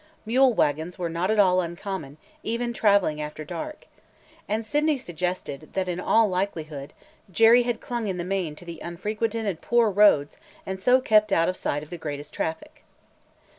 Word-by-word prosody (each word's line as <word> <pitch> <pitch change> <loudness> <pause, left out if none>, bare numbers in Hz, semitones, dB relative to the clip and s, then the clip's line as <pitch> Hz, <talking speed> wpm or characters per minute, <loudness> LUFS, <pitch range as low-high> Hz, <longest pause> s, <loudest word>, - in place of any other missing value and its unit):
Mule 255 +4 +4
wagons 160 - 0
were 170 -2 -3
not 170 +3 -1
at 220 - +2
all 185 -3 +5
uncommon, 170 -4 -6 0.2
even 235 +1 -2
traveling 200 -9 +2
after 150 0 -6
dark. 175 - -7 0.6
And 220 +2 -1
Sydney 295 +4 +1
suggested 175 - -4
that, 190 -1 -1
in 180 0 -2
all 220 +4 +3
likelihood, 160 -7 -3 0.4
Jerry 225 +6 +6
had 240 -2 -2
clung 240 -3 -3
in 190 -2 -2
the 175 - -3
main 180 -4 -2
to 170 +1 -9
unfrequented 215 +6 -3
and 185 -5 -3
poor 235 -2 +3
roads 195 -8 +4 0.3
and 190 0 -4
so 250 +6 +4
kept 215 -3 +3
out 165 -2 +3
of 185 - -2
sight 145 -4 -2
of 155 - -14
the 175 - -6
greatest 145 -2 -6
traffic. 160 0 -5
185 Hz, 170 wpm, -25 LUFS, 165-220 Hz, 0.6 s, Jerry